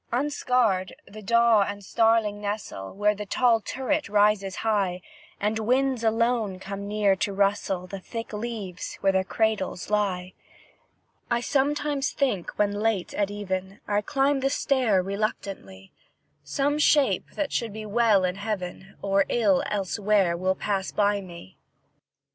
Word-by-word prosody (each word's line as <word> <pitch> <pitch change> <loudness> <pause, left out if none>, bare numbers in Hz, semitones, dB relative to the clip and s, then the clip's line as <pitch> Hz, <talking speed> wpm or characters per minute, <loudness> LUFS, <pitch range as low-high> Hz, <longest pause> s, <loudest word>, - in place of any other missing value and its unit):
Unscared, 245 -7 +1
the 215 +2 -11
daw 235 0 +4
and 205 0 -3
starling 225 -1 +2
nestle, 205 - -4
Where 210 +1 +2
the 210 0 -7
tall 235 +1 +3
turret 265 +3 -2
rises 205 -2 +2
high, 195 -5 0 0.4
And 215 +2 0
winds 255 +2 +1
alone 225 -3 +1
come 200 +1 -6
near 205 -2 +2
to 200 - -1
rustle 195 -2 0
The 195 +1 -7
thick 230 +4 -7
leaves 210 -5 -5
where 195 - +4
their 190 0 +1
cradles 210 -2 -1
lie, 190 -3 0 1.0
I 235 - +2
sometimes 285 +2 0
think, 250 -11 0
when 205 -1 +2
late 205 -2 -1
at 200 -1 0
even 195 -1 -4
I 205 0 +1
climb 275 +5 +1
the 270 +1 +1
stair 250 -9 +2
reluctantly, 195 - -4 0.5
Some 280 - 0
shape 275 -10 +3
that 295 -2 -2
should 230 -2 -1
be 215 +1 -7
well 215 -2 +3
in 180 +1 -1
heaven, 195 -2 -5
Or 195 0 +2
ill 205 -6 +3
elsewhere, 200 -2 +1
will 185 +2 0
pass 195 -1 -2
by 205 -1 +1
me. 170 - -12
205 Hz, 140 wpm, -26 LUFS, 195-230 Hz, 1.0 s, daw